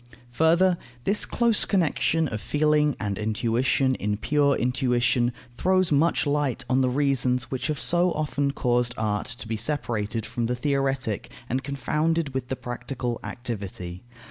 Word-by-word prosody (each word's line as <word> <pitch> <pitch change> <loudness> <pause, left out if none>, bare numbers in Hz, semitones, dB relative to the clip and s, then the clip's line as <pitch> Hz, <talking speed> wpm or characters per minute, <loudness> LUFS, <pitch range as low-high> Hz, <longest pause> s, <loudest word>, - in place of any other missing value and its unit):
Further, 170 +6 +3 0.2
this 205 +8 +3
close 235 -3 +2
connection 165 -3 +1
of 105 -4 -4
feeling 150 +4 +2
and 100 -1 -3
intuition 115 +5 +1
in 105 -4 -2
pure 145 +4 +2
intuition 125 -1 +1 0.2
throws 185 +5 +2
much 155 +4 +3
light 145 -3 0
on 130 +1 +2
the 130 - +2
reasons 125 -2 0
which 130 -2 -2
have 150 -2 -2
so 175 +1 +3
often 145 -2 -1
caused 125 -3 0
art 105 -1 -1
to 125 -3 -6
be 110 0 -2
separated 115 -4 -2
from 120 -1 -2
the 125 - -1
theoretic 135 -4 -1 0.2
and 130 +3 -2
confounded 150 +3 -1
with 130 -1 -3
the 130 - -2
practical 120 -1 -4
activity. 100 -7 -5
130 Hz, 145 wpm, -25 LUFS, 120-150 Hz, 0.2 s, Further